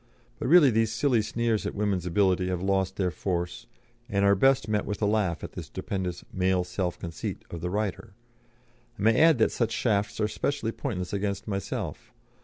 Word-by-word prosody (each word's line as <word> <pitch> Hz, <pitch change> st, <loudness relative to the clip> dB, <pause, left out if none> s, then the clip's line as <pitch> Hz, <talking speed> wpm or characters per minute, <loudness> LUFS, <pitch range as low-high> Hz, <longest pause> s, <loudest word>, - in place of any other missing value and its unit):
But -, -, -2 dB
really 155 Hz, -3 st, +7 dB
these 110 Hz, -1 st, +2 dB
silly 130 Hz, -6 st, +2 dB
sneers 115 Hz, 0 st, -1 dB
at -, -, -5 dB
woman's 100 Hz, -4 st, -1 dB
ability 95 Hz, 0 st, +2 dB
have 90 Hz, -1 st, -2 dB
lost 95 Hz, -1 st, +1 dB
their 95 Hz, -3 st, 0 dB
force, 90 Hz, -1 st, -3 dB, 0.4 s
and 100 Hz, -2 st, +2 dB
are 100 Hz, -, +6 dB
best 135 Hz, +3 st, +3 dB
met 105 Hz, -1 st, +1 dB
with 105 Hz, -, -4 dB
a 105 Hz, -, +1 dB
laugh 105 Hz, -5 st, 0 dB
at -, -, -6 dB
the -, -, -6 dB
stupendous 90 Hz, -3 st, -4 dB
'male 95 Hz, -1 st, +2 dB
self 90 Hz, 0 st, -3 dB
conceit' 85 Hz, -2 st, -6 dB
of 85 Hz, -, -6 dB
the 90 Hz, -, -2 dB
writer. 100 Hz, -1 st, -3 dB, 0.8 s
I -, -, -8 dB
may 115 Hz, +6 st, +4 dB
add 160 Hz, -3 st, +6 dB
that 110 Hz, -, +3 dB
such 115 Hz, -2 st, 0 dB
shafts 105 Hz, -3 st, 0 dB
are 105 Hz, -, +2 dB
specially 140 Hz, +1 st, -2 dB
pointless 100 Hz, -10 st, -4 dB
against 100 Hz, 0 st, -2 dB
myself. 100 Hz, -2 st, -4 dB
100 Hz, 190 wpm, -27 LUFS, 95-110 Hz, 0.8 s, really